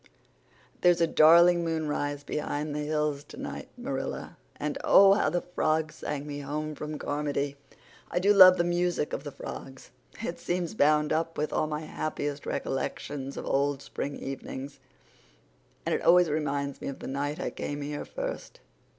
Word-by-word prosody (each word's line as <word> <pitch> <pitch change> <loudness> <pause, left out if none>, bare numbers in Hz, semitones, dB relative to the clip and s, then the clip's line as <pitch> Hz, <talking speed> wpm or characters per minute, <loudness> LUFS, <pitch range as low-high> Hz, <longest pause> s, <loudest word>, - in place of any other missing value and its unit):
"There's 175 -1 +5
a 170 - +5
darling 170 +2 +6
moonrise 150 -3 -2
behind 150 0 -3
the 150 - -2
hills 150 -1 -1
tonight, - - -7
Marilla, - - -4 0.2
and 150 -1 -3
oh, 195 0 +7
how 205 - +2
the 175 - -1
frogs 155 -3 0
sang 145 -1 -4
me 145 -1 -5
home 150 +2 -4
from 150 +1 -5
Carmody! 145 -1 -2 0.5
I - - -3
do 200 +3 +4
love 185 -2 +9
the 170 - +3
music 175 -2 0
of - - -3
the 145 - -6
frogs. 135 0 -9 0.3
It 190 -6 -4
seems 175 0 -2
bound 150 -5 +3
up 165 +1 -1
with 150 +1 -1
all 155 - +1
my 150 0 -3
happiest 145 -2 -4
recollections 135 +1 -3
of - - -5
old 140 0 +1
spring 140 - -4
evenings. 135 +1 -7 1.1
And - - 0
it - - 0
always 175 -2 +5
reminds 140 -2 -2
me - - -5
of 140 - -4
the - - -9
night 145 +3 -3
I - - -2
came 145 0 -4
here 145 +1 -4
first. - - -6
150 Hz, 165 wpm, -28 LUFS, 145-170 Hz, 1.1 s, love